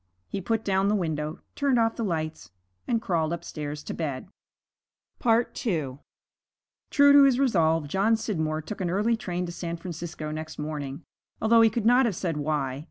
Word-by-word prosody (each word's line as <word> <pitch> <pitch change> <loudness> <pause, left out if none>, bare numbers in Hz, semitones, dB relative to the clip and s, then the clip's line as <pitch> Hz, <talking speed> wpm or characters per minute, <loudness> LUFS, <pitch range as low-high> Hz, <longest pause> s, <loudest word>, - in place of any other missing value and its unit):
He 195 - -4
put 225 +3 -1
down 195 0 +2
the 210 - +3
window, 155 -4 -2
turned 280 -3 +1
off 225 -1 +2
the 230 - -3
lights, 160 -5 -3 0.4
and 235 -2 +1
crawled 165 -7 0
upstairs 150 -3 -5
to - - -5
bed. 145 -1 -4 0.9
II 200 - 0 0.9
True 285 0 +6
to 285 - +9
his 270 -3 +5
resolve, 165 - +2
John 200 +8 +2
Scidmore 160 -8 -2
took 205 +4 -6
an 180 - 0
early 210 +6 +2
train 180 -5 -3
to 170 - -5
San 170 -1 -5
Francisco 165 -3 -6
next 155 +1 -6
morning, 150 -1 -5 0.4
although 230 +1 +5
he 225 - +6
could 220 0 -3
not 245 +2 +5
have 210 - -2
said 165 -4 -2
why. 145 -3 -1
175 Hz, 170 wpm, -26 LUFS, 155-225 Hz, 0.9 s, to